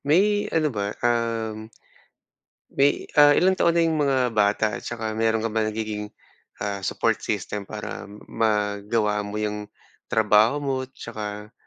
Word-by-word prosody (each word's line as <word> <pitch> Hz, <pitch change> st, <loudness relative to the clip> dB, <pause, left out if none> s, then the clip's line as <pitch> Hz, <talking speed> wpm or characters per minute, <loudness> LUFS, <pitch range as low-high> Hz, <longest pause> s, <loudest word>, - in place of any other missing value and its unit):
May 205 Hz, +7 st, +3 dB
ano 155 Hz, -4 st, +1 dB
ba, 100 Hz, -1 st, -2 dB, 0.2 s
um, 115 Hz, -2 st, -1 dB, 1.0 s
may, 140 Hz, +1 st, +2 dB, 0.2 s
ah, 145 Hz, 0 st, +7 dB
ilang 185 Hz, +1 st, +4 dB
taon 170 Hz, -2 st, +2 dB
na 170 Hz, -, +4 dB
yung 160 Hz, -2 st, +1 dB
mga 130 Hz, -4 st, +2 dB
bata? 105 Hz, 0 st, +2 dB
At -, -, -16 dB
saka 110 Hz, -2 st, -4 dB
meron 110 Hz, 0 st, +1 dB
ka 115 Hz, -, -1 dB
ba 110 Hz, -, +1 dB
nagiging, 110 Hz, -1 st, -3 dB, 0.5 s
ah, 100 Hz, -1 st, -3 dB
support 95 Hz, -, 0 dB
system? 100 Hz, -1 st, -3 dB
Para 105 Hz, -1 st, -6 dB, 0.2 s
magawa 105 Hz, -1 st, 0 dB
mo 105 Hz, 0 st, -5 dB
'yang 105 Hz, -1 st, -3 dB, 0.4 s
trabaho 110 Hz, +3 st, +4 dB
mo, 135 Hz, -1 st, 0 dB
tsaka 105 Hz, -4 st, -7 dB
110 Hz, 145 wpm, -24 LUFS, 105-130 Hz, 1.0 s, ah